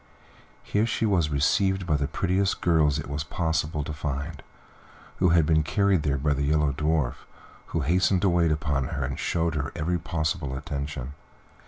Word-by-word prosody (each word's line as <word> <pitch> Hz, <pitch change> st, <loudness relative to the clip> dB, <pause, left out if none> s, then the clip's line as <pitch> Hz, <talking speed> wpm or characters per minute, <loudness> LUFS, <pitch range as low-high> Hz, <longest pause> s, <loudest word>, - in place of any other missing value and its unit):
Here 105 Hz, +2 st, +1 dB
she 115 Hz, -, 0 dB
was 90 Hz, -7 st, +2 dB
received 95 Hz, +7 st, +1 dB
by 80 Hz, -3 st, +1 dB
the 70 Hz, -1 st, 0 dB
prettiest 95 Hz, +5 st, 0 dB
girls 80 Hz, -4 st, +3 dB
it -, -, -5 dB
was 70 Hz, +1 st, -3 dB
possible 80 Hz, -1 st, -1 dB
to 75 Hz, -, -5 dB
find, 75 Hz, +2 st, -4 dB, 0.8 s
who 90 Hz, -, +3 dB
had 85 Hz, -2 st, +4 dB
been 80 Hz, 0 st, +3 dB
carried 100 Hz, +2 st, +2 dB
there 70 Hz, -2 st, 0 dB
by 70 Hz, +2 st, +1 dB
the 70 Hz, -, -2 dB
Yellow 75 Hz, 0 st, +2 dB
Dwarf, 75 Hz, -2 st, -1 dB, 0.4 s
who 80 Hz, -, -2 dB
hastened 90 Hz, +5 st, +2 dB
to 100 Hz, -, +4 dB
wait 85 Hz, -2 st, +3 dB
upon 75 Hz, -3 st, 0 dB
her 70 Hz, -1 st, -3 dB
and 65 Hz, +1 st, -4 dB
showed 85 Hz, -1 st, 0 dB
her 75 Hz, -1 st, -2 dB
every 85 Hz, +2 st, -1 dB
possible 75 Hz, -4 st, -2 dB
attention. 70 Hz, -1 st, -5 dB
75 Hz, 175 wpm, -26 LUFS, 70-85 Hz, 0.8 s, had